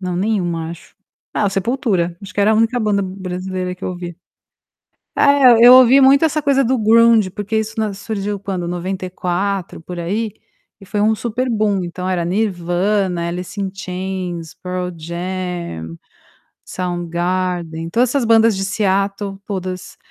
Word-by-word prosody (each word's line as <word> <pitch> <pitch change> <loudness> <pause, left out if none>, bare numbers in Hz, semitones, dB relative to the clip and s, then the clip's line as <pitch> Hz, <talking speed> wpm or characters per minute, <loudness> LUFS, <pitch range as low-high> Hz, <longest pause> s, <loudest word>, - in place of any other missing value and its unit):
Não, 180 -2 -3
nenhuma 175 -5 -1
acho; 170 - -12 0.4
Ah, 205 - +2
Sepultura, 195 -4 -1
acho 200 - -9
que - - 0
era 210 +2 +4
a - - +3
única 225 +3 +2
banda 205 -2 +1
brasileira 185 -1 -4
que 180 - -10
eu - - -1
ouvia. 175 -2 -7 1.0
Eh, 275 -4 +6
eu 250 - +10
ouvi 255 +1 +8
muito 275 +3 +6
essa 305 -1 0
coisa 280 -2 +3
do 260 +1 +1
ground, 225 -1 +5
porque 210 +2 -2
isso 220 0 -4
na 215 -2 -1
surgiu 205 0 -4
quando? 190 -3 -4
94 185 +1 -3
por 175 +1 -7
aí, 205 +6 -2 0.5
e - - -12
foi 205 +2 -2
um 215 +1 +3
super 240 +3 -2
bum, 210 -4 +1
então, 180 +1 -4
era 175 -2 0
Nirvana, 180 -1 0
Alice 180 +3 -5
In 195 - -1
chains, 180 -3 -5
Pearl 180 0 -4
Jam, 170 - -5 0.7
Sound 175 -1 -4
Garden, 175 -1 -2
todas 240 +8 +2
essas 275 -1 +1
bandas 225 -2 +4
de 195 - -2
Seattle, 195 0 -1
todas, 185 -2 -5
190 Hz, 155 wpm, -18 LUFS, 180-215 Hz, 1.0 s, eu